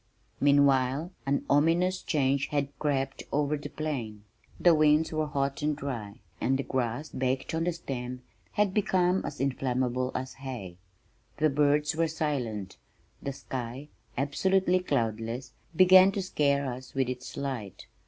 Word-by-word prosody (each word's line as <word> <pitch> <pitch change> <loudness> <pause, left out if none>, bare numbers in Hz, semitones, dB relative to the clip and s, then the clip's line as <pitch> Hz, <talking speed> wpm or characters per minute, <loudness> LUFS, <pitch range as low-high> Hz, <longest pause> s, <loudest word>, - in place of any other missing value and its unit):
Meanwhile 140 +2 +3 0.2
an 140 +1 +1
ominous 170 +6 +3
change 140 -2 +1
had 145 -2 -1
crept 135 -2 -1
over 145 +1 +1
the 145 0 -6
plain. 120 -11 -4 0.4
The 175 - +6
winds 155 0 +4
were 155 -1 -1
hot 140 -1 -1
and 150 0 +1
dry 115 -8 -6 0.2
and 135 +1 +2
the 135 - -2
grass, 130 +3 -2
baked 130 +2 -2
on 165 +1 0
the 175 - +2
stem, 125 -6 -5 0.3
had 205 -3 +2
became 185 -2 +2
as - - -6
inflammable 130 -1 0
as 130 0 -3
hay. 115 -10 -6 0.6
The 155 -1 +3
birds 150 +2 +2
were 165 0 +2
silent. 125 -11 -3 0.4
The 140 - -3
sky, 130 +2 -6 0.3
absolutely 185 +7 +2
cloudless, 115 - -2 0.2
began 185 +2 +8
to 195 - -2
scare 140 -5 +1
us 130 0 -6
with 135 -2 +1
its 125 0 -6
light. 125 -9 -5
140 Hz, 145 wpm, -29 LUFS, 130-155 Hz, 0.6 s, began